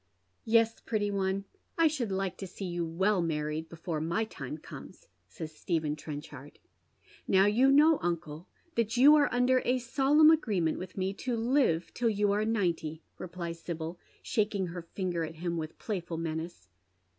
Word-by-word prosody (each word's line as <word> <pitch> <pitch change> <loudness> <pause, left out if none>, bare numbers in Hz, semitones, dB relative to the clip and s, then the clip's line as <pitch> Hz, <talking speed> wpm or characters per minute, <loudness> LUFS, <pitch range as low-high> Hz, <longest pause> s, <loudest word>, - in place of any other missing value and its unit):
" - - -45
Yes, 230 0 +3
pretty 205 -2 -1
one, 195 0 -1 0.3
I 330 -1 +5
should 265 -9 -2
like 190 -1 -1
to 195 - -6
see 190 +2 -7
you 175 -1 -2
well 190 +4 +1
married 155 -1 -2
before 165 -1 -4
my 170 +7 0
time - - -7
comes," - - -12 0.2
says 160 -3 -8
Stephen 155 -4 -1
Trenchard. 145 -2 -9 0.4
" - - -43 0.3
Now 190 0 +5
yom 255 +7 +4
know, 310 +2 +6
uncle, 170 -1 -3 0.3
that 230 -1 0
yovi 280 +4 +8
are 295 -1 +5
under 250 +1 +3
a 250 +1 +2
solemn 275 +5 +5
agree 235 - +1
ment 160 -2 0
with 185 +1 -8
me 190 +1 -1
to 245 -2 -1
live 225 - +1
till 235 -1 +1
you 205 -1 +1
are 210 +1 +1
ninety," 170 -7 -1 0.2
replies 170 -2 -6
Sibyl, 165 0 -5 0.2
sh^ng 205 -4 0
her 175 +1 -6
finger 175 0 -3
at 160 0 -6
him 170 +1 -3
with 155 -1 -5
playful 175 -6 -4
menace. 160 - -5
190 Hz, 175 wpm, -30 LUFS, 165-230 Hz, 0.4 s, yovi